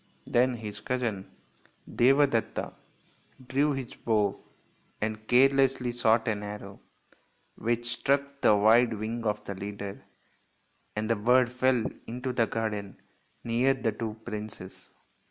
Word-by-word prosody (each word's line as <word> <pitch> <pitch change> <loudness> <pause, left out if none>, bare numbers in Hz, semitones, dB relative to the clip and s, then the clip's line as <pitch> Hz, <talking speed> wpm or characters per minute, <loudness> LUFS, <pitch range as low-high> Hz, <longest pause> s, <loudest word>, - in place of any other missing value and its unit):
Then 125 +1 +2
his 105 -2 -7
cousin, 115 -4 -3 0.7
Deva 135 +4 +5
detta, 115 -5 -2 0.7
drew 140 +3 +2
his 135 -3 -5
bow 105 -3 0 0.6
and 110 0 -3
carelessly 135 0 +4
shot 115 -1 +2
an 105 -2 0
arrow, 105 -1 -8 0.7
which 120 +1 -1
struck 140 0 0
the 105 - +6
wide 115 +3 +5
wing 110 +2 -4
of 105 -1 -1
the 100 - -4
leader, 100 +1 -7 0.9
and 105 +1 -2
the 115 - +2
bird 120 +3 +3
fell 125 -2 +2 0.2
into 125 +2 -4
the 115 -2 +2
garden 105 -3 -3 0.4
near 120 +4 +2
the 115 -4 -1
two 110 0 -5
princes. 105 -4 -8
115 Hz, 125 wpm, -28 LUFS, 105-125 Hz, 0.9 s, the